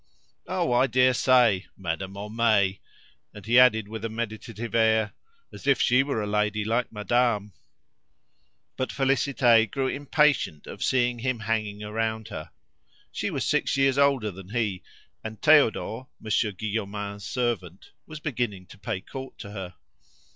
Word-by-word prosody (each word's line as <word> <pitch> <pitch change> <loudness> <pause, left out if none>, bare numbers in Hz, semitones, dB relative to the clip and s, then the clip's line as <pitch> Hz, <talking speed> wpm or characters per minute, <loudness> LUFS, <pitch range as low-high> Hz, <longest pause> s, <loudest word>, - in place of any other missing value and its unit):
"Oh, - - -1
I 120 +2 +4
daresay! 125 -4 +4
Madame 95 +1 -4
Homais!" 105 -2 +1 0.6
And 100 - -11
he 120 +3 +5
added 110 -4 +5
with 110 0 -7
a 115 - -2
meditative 115 0 -5
air, 110 -2 +3 0.4
"As - - -10
if 140 -2 +4
she 125 +2 +4
were 135 -6 -2
a - - -2
lady 105 0 0
like 115 +2 0
madame!" 105 -1 0 1.2
But 130 - -2
Félicité 125 -4 +3
grew 135 -2 -1
impatient 145 - +1
of - - -7
seeing 125 -2 +1
him 125 -1 -2
hanging 110 -2 -2
round 110 +1 -3
her. 75 - -7 0.6
She - - -2
was - - -2
six - - +1
years 135 0 +3
older 135 -7 +3
than 95 0 -12
he, 105 -5 -1 0.4
and 110 -1 -7
Theodore, 130 -5 +3
Monsieur 110 0 0
Guillaumin's 100 0 -4
servant, 115 -8 -3 0.2
was 155 -1 -8
beginning 120 -10 -3
to 100 - -14
pay 95 -1 -4
court 135 +5 -9
to 100 - -9
her. 95 -4 -7
110 Hz, 145 wpm, -26 LUFS, 105-125 Hz, 1.2 s, he